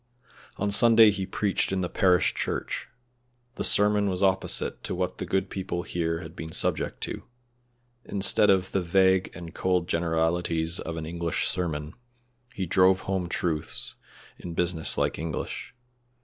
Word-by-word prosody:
On 100 Hz, +1 st, -1 dB
Sunday 115 Hz, +1 st, +7 dB
he 95 Hz, -2 st, -3 dB
preached 100 Hz, 0 st, 0 dB
in 95 Hz, -1 st, 0 dB
the 90 Hz, -, -1 dB
parish 90 Hz, -1 st, +3 dB
church. -, -, -3 dB, 0.7 s
The -, -, -4 dB
sermon 105 Hz, 0 st, +3 dB
was 95 Hz, 0 st, -1 dB
opposite 95 Hz, -1 st, 0 dB
to -, -, -3 dB
what 90 Hz, 0 st, -3 dB
the -, -, -4 dB
good 95 Hz, 0 st, 0 dB
people 90 Hz, -2 st, -3 dB
here 85 Hz, -2 st, -2 dB
had 80 Hz, 0 st, -10 dB
been 80 Hz, -2 st, -7 dB
subject -, -, -1 dB
to; -, -, -4 dB, 0.8 s
instead 100 Hz, +1 st, +2 dB
of 95 Hz, -1 st, +3 dB
the 95 Hz, -, +1 dB
vague 95 Hz, +1 st, +3 dB
and 85 Hz, -2 st, -9 dB
cold 90 Hz, -2 st, 0 dB
generalities 85 Hz, 0 st, 0 dB
of 80 Hz, -, -5 dB
an 80 Hz, -, -4 dB
English 85 Hz, 0 st, -1 dB
sermon, 80 Hz, -3 st, -2 dB, 0.6 s
he 95 Hz, -5 st, -3 dB
drove 95 Hz, +2 st, +4 dB
home 95 Hz, -3 st, -2 dB
truths 80 Hz, -3 st, -2 dB, 0.5 s
home 90 Hz, -, -7 dB
in -, -, -5 dB
business 85 Hz, -2 st, +1 dB
like -, -, 0 dB
English. 80 Hz, -, -5 dB
90 Hz, 155 wpm, -27 LUFS, 85-95 Hz, 0.8 s, Sunday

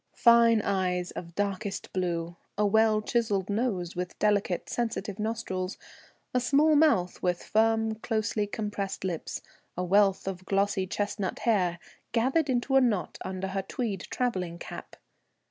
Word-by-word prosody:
Fine 235 Hz, -2 st, +6 dB
eyes 180 Hz, -2 st, 0 dB
of 170 Hz, -1 st, -8 dB
darkest 200 Hz, 0 st, -3 dB
blue, 175 Hz, -2 st, -2 dB, 0.2 s
a 210 Hz, -, +3 dB
well 215 Hz, +1 st, +3 dB
chiseled 210 Hz, -5 st, 0 dB
nose 200 Hz, -6 st, -1 dB
with 180 Hz, 0 st, -4 dB
delicate, 205 Hz, -4 st, +1 dB
sensitive 215 Hz, -4 st, -3 dB
nostrils, 210 Hz, -4 st, -3 dB, 0.6 s
a 250 Hz, -, +3 dB
small 290 Hz, +5 st, +4 dB
mouth 285 Hz, -, +3 dB
with 180 Hz, -1 st, 0 dB
firm 225 Hz, 0 st, +2 dB
closely 220 Hz, -1 st, -1 dB
compressed 205 Hz, -2 st, -4 dB
lips, 175 Hz, -4 st, -4 dB, 0.3 s
a 180 Hz, -, 0 dB
wealth 195 Hz, +1 st, +3 dB
of 185 Hz, -1 st, -4 dB
glossy 195 Hz, -1 st, +1 dB
chestnut 205 Hz, 0 st, -2 dB
hair, 185 Hz, -7 st, +1 dB, 0.4 s
gathered 265 Hz, +6 st, +2 dB
into 260 Hz, +1 st, +1 dB
a 270 Hz, -, +7 dB
knot 210 Hz, -, 0 dB
under 190 Hz, 0 st, -4 dB
her 195 Hz, 0 st, -1 dB
tweed 200 Hz, -2 st, -4 dB
travelling 185 Hz, -9 st, -1 dB
cap. -, -, -9 dB
205 Hz, 140 wpm, -28 LUFS, 185-225 Hz, 0.6 s, a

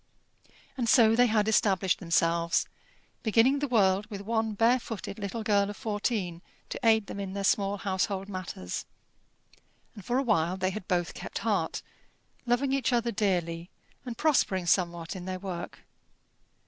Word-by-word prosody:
And 235 Hz, -3 st, 0 dB
so 225 Hz, -3 st, +6 dB
they 245 Hz, +1 st, +5 dB
had 215 Hz, -2 st, +2 dB
established 195 Hz, -3 st, +2 dB
themselves, 170 Hz, -1 st, +1 dB, 0.6 s
beginning 235 Hz, +5 st, +3 dB
the 290 Hz, -, -1 dB
world 200 Hz, -4 st, +2 dB
with 200 Hz, -3 st, -7 dB
one 220 Hz, +1 st, -1 dB
bare 235 Hz, +4 st, +4 dB
footed 220 Hz, -3 st, -7 dB
little 210 Hz, +3 st, -4 dB
girl 205 Hz, -2 st, +2 dB
of 205 Hz, -, -7 dB
fourteen 205 Hz, -5 st, -2 dB, 0.3 s
to -, -, -5 dB
aid 220 Hz, -2 st, +4 dB
them 200 Hz, -, -7 dB
in 195 Hz, -1 st, -4 dB
their 200 Hz, 0 st, -3 dB
small 200 Hz, 0 st, +2 dB
household 195 Hz, 0 st, -2 dB
matters; 185 Hz, -, -5 dB, 1.1 s
and 205 Hz, -, -11 dB
for 245 Hz, +5 st, 0 dB
a 270 Hz, -, +2 dB
while 185 Hz, -7 st, +1 dB
they 185 Hz, 0 st, 0 dB
had 190 Hz, -1 st, -7 dB
both 175 Hz, -1 st, 0 dB
kept -, -, -6 dB
heart, -, -, 0 dB, 0.6 s
loving 255 Hz, +3 st, +1 dB
each 275 Hz, -1 st, +1 dB
other 235 Hz, -1 st, +1 dB
dearly, 175 Hz, -5 st, -1 dB, 0.3 s
and 245 Hz, -3 st, -6 dB
prospering 200 Hz, -, +2 dB
somewhat 170 Hz, -1 st, 0 dB
in 180 Hz, -1 st, -7 dB
their 185 Hz, 0 st, -3 dB
work. 185 Hz, -2 st, -6 dB
200 Hz, 160 wpm, -28 LUFS, 185-225 Hz, 1.1 s, so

